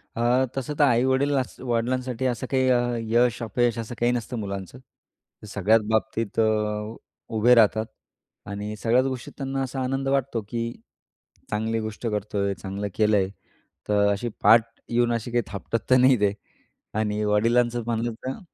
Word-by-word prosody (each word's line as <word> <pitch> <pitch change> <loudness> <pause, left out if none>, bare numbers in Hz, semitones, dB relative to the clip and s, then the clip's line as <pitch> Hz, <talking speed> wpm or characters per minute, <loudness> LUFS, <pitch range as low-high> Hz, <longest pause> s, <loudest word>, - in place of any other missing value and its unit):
अ, 120 +3 +2
तसं 135 +2 -3
तर - - +6
आई-वडील 130 +2 +3 0.3
वडिलांसाठी 125 +1 -1
असं 125 0 -1
काही 130 -1 +2 0.5
यश-अपयश 120 -1 +2
असं 115 +1 -5
काही 120 +1 +3
नसतं 120 0 -3
मुलांचं, 100 +2 -6 0.7
सगळ्याच 105 +2 +3
बाबतीत 110 0 -1
अ, 115 - +5 0.9
उभे 120 +3 +5
राहतात 110 -1 +4 0.6
आणि 105 +1 -5
सगळ्याच 120 +4 +2
गोष्टीत 130 -2 -4
त्यांना 135 -1 -3
असा 130 0 -4
आनंद 135 +1 -2
वाटतो 135 -4 0
की 115 0 -2 0.8
चांगली 110 +2 -1
गोष्ट 110 +1 -5
करतोय, 105 -2 -1
चांगलं 95 +4 -5
केलंय 105 -3 +2 0.6
तर 105 -1 +3
अशी 105 +4 -2
पाठ 110 +2 +6 0.2
येऊन 120 0 +2
अशी 115 +1 -3
काही 120 -1 +1
थापटत 110 +3 -4
तर 130 - +6
नाही 130 -1 +5
ते 100 -1 +3 0.7
आणि 105 0 -1
वडिलांचं 120 +3 +2
म्हणलं 115 0 -1
तर 130 - -4
115 Hz, 140 wpm, -25 LUFS, 105-125 Hz, 0.9 s, तर